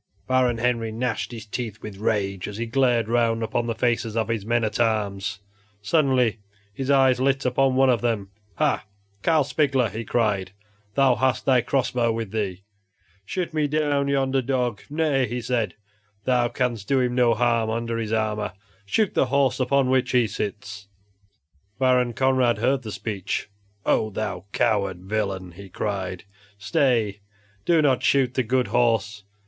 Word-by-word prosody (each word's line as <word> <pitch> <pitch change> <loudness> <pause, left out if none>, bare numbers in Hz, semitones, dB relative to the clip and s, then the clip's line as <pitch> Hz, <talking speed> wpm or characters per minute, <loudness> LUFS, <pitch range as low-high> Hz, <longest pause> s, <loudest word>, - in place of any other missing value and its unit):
Baron 130 -2 +2
Henry 115 -1 0
gnashed 115 0 -2
his 115 -3 -8
teeth 110 -1 -5
with 105 -2 -7
rage 100 -3 -1
as 105 - -7
he 115 - -2
glared 120 -2 +2
around 115 -1 +1
upon 115 +1 -1
the 115 - -2
faces 115 -2 0
of 110 -1 0
his 115 -3 -1
men 120 0 +2
at 110 - -2
arms. 105 -4 -1 0.4
Suddenly 125 -3 +2 0.3
his 135 +5 -4
eye 135 -2 +5
lit 135 +1 +1
upon 130 +1 +2
one 135 0 +5
of 120 - +1
them. 110 -5 -1 0.2
"Ha! - - 0 0.3
Carl 160 +2 +3
Spigler," 135 -4 +1
he 115 +3 -5
cried, 105 -5 0 0.4
"thou 135 -2 +5
hast 125 0 0
thy 130 -2 +4
cross 125 0 0
bow 120 -2 +1
with 110 -3 -4
thee; 100 -4 -3 0.6
shoot 175 - -3
me 155 -2 +1
down 145 -1 +1
yonder 135 -1 +1
dog! 125 -4 -1
Nay," 145 -4 +1
he 120 +3 -3
said, 115 -5 -1 0.5
"thou 125 -2 +2
canst 120 -5 -2
do 135 - +2
him 125 -1 +1
no 120 -2 +3
harm 115 -1 +1
under 115 0 -2
his 110 -2 -3
armor; 105 -3 -1 0.3
shoot 215 - +1
the 135 - +2
horse 135 -1 +2
upon 135 +1 +2
which 130 0 +1
he 125 -2 +4
sits." 105 -1 -5 0.9
Baron 125 -1 +2
Conrad 130 -1 +2
heard 130 +4 +1
the 110 -3 -7
speech. 105 -1 -4 0.3
"Oh! 110 - +2
thou 100 -3 -4
coward 100 -6 0
villain!" 95 -3 -2
he 95 +3 -12
cried, 95 -2 -3 0.3
"stay; 105 0 +1 0.5
do 165 -3 +4
not 135 -4 +3
shoot 130 -3 +2
the 130 - +1
good 125 -1 0
horse. 115 -3 +1
120 Hz, 165 wpm, -24 LUFS, 105-130 Hz, 0.9 s, eye